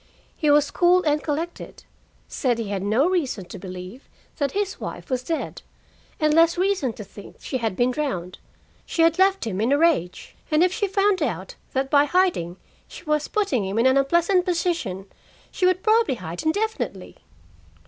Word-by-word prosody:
He 305 - 0
was 290 0 +4
cool 360 +1 +4
and 300 -1 +1
collected: 315 +5 -5 0.4
said 245 -4 -1
he 225 -3 -4
had 200 -2 -2
no 220 - +2
reason 295 - -1
to 190 - -10
believe 185 +6 -9 0.3
that 280 -3 -1
his 400 -1 -2
wife - - -7
was 255 -1 0
dead, 320 +5 -4 0.6
and 305 -1 +2
less 330 +2 +4
reason 370 -8 +1
to 215 - -8
think 205 0 -13
she 260 - -4
had 225 -5 -2
been 245 +4 +2
drowned; 185 - -4 0.4
she 330 - 0
had 330 +1 +3
left 385 -5 +3
him 205 -3 -3
in 235 +4 +1
a 285 - +4
rage, 290 - 0 0.2
and 310 +2 +3
if 365 0 +2
she 410 0 -1
found 390 -1 +1
out 190 - -3 0.2
that 270 0 -1
by 290 -1 +5
hiding 295 - +1 0.3
she - - -12
was 300 -2 0
putting 390 - 0
him 195 +2 -3
in 230 - +3
an 260 0 +5
unpleasant 340 +7 +3
position, 335 - -2 0.5
she 365 - +1
would 370 0 +1
probably 440 - +3
hide 170 -6 -6
indefinitely. 430 +8 -2
295 Hz, 180 wpm, -23 LUFS, 225-360 Hz, 0.6 s, by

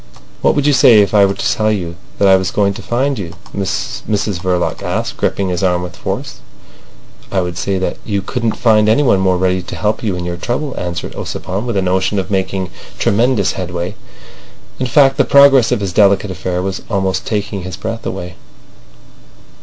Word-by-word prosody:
"What - - +3
would 145 - +1
you 145 - +4
say 120 -5 +7
if 100 0 0
I 100 -2 +6
were 100 - -2
to 125 - 0
tell 110 -2 +1
you 85 -5 -3 0.2
that 100 - +3
I 95 - +7
was 95 -1 0
going 100 0 +1
to - - -8
find 120 +6 -1
you?" 85 -4 -6 0.2
Mrs 100 0 -2
Verloc 90 -1 -1
asked, - - -2
gripping 95 -1 -1
his 90 -1 -2
arm 90 -2 +1
with 90 -1 -7
force. - - -5 0.9
"I 95 - +1
would 90 -1 -4
say 95 +2 -1
that 95 - -2
you 100 -3 -2
couldn't 115 +1 -2
find 110 -2 +4
anyone 115 -3 +3
more 95 -1 +2
ready 95 0 +1
to 90 - -8
help 105 0 -1
you 105 -5 -1
in 90 -1 -4
your 85 0 -3
trouble," 125 - -3
answered 85 -1 -4
Ossipon, 95 +6 -4
with 115 -4 -1
a 95 - +1
notion 95 +2 0
of 95 +1 -2
making 95 -1 -1 0.3
tremendous 110 -2 +2
headway. 90 0 -4 0.9
In 130 - -1
fact, 135 +2 +4
the - - +4
progress 140 -4 +6
of 125 - +3
this 95 -3 -3
delicate 100 -1 +3
affair 90 0 -3
was 95 0 -3
almost 95 -3 -1
taking 100 -2 -2
his 90 0 -7
breath 115 +2 -5
away. 90 -2 -6
100 Hz, 195 wpm, -16 LUFS, 90-110 Hz, 0.9 s, say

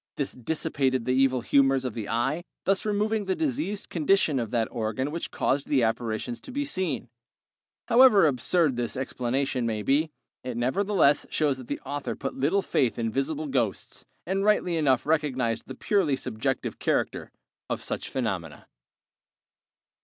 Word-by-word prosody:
This 140 - -2
dissipated 130 -2 -1
the 130 - +1
evil 130 -1 +3
humors 135 +1 +3
of 125 - -2
the 110 -3 -5
eye, 135 +9 0 0.2
thus 195 +1 +1
removing 210 0 0
the 190 - 0
diseased 260 -9 -2
condition 160 -3 +2
of 115 -3 -3
that 115 -1 0
organ 115 +4 -2
which 170 +2 -4
caused 140 +1 0
the 135 -4 +2
apparitions 115 +1 -2
to - - -9
be 285 +2 -2
seen. 180 - -2 0.8
However 230 -6 +7
absurd 145 +1 +2
this 120 +2 -2
explanation 130 0 -1
may 110 -2 -2
be, 150 +6 +2 0.3
it 125 -2 -4
nevertheless 145 - +2
shows 145 -3 +1
that 125 - -10
the - - -3
author 145 +1 -4
put 135 - -4
little 165 +9 +1
faith 125 -4 +1
in 115 -1 -1
visible 145 +5 -2
ghosts, 125 -9 -2 0.2
and 190 +3 0
rightly 205 -4 +2
enough 135 -6 +2
recognized 135 -7 0
the 130 - -7
purely 195 - +1
subjective 130 +2 -3
character - - -1 0.4
of - - -1
such - - -4
phenomena. 95 - -3
135 Hz, 155 wpm, -27 LUFS, 120-170 Hz, 0.8 s, However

